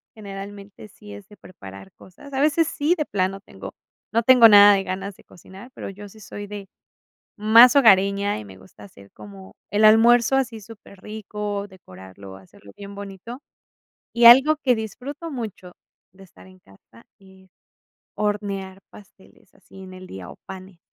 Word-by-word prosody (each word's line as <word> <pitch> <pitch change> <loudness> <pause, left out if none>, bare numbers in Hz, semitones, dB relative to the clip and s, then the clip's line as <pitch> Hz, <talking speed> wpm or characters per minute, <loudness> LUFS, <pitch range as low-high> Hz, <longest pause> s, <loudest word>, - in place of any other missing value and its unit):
generalmente 200 0 -11
sí 105 - -15
es 100 0 -13
de 210 - -18
preparar 95 - -14
cosas. 280 +10 -17
A 265 - -3
veces 310 +2 +1
sí, 315 +4 -1
de 305 - -2
plano 195 0 -3
tengo, - - -12 0.4
no 230 +1 +1
tengo 250 -2 +7
nada 205 0 +8
de 195 - -2
ganas 195 +1 -6
de - - -22
cocinar, 190 +6 -16
pero, - - -8
yo 205 +1 -12
sí 220 - -18
soy 205 0 -10
de 200 -1 -9 0.7
más 230 +4 +6
hogareña, 200 -5 +3
y 105 - -11
me 95 -1 -14
gusta 95 +2 -18
hacer 100 0 -17
como 100 -2 -14 0.2
el 210 +1 +2
almuerzo 235 +4 +4
así 250 -4 -2
súper 200 -2 -16
rico, 210 -1 -6
decorarlo 95 - -14
hacerlo 95 +1 -19
bien 200 0 -11
bonito. 200 +6 -10 0.7
Y 235 0 +4
algo 270 +6 +7
que 250 -2 +2
disfruto 265 +9 -8
mucho 215 -8 -8 0.4
de 195 - -19
estar 185 - -19
en 185 0 -20
casa, 115 - -22
es 190 -1 -21 0.7
hornear 200 -2 -4
pasteles 200 -1 -20
así 190 - -17
en 185 0 -12
el 185 0 -12
día, 95 - -11
o - - -14
panes. 190 -1 -12
200 Hz, 165 wpm, -21 LUFS, 185-225 Hz, 0.7 s, nada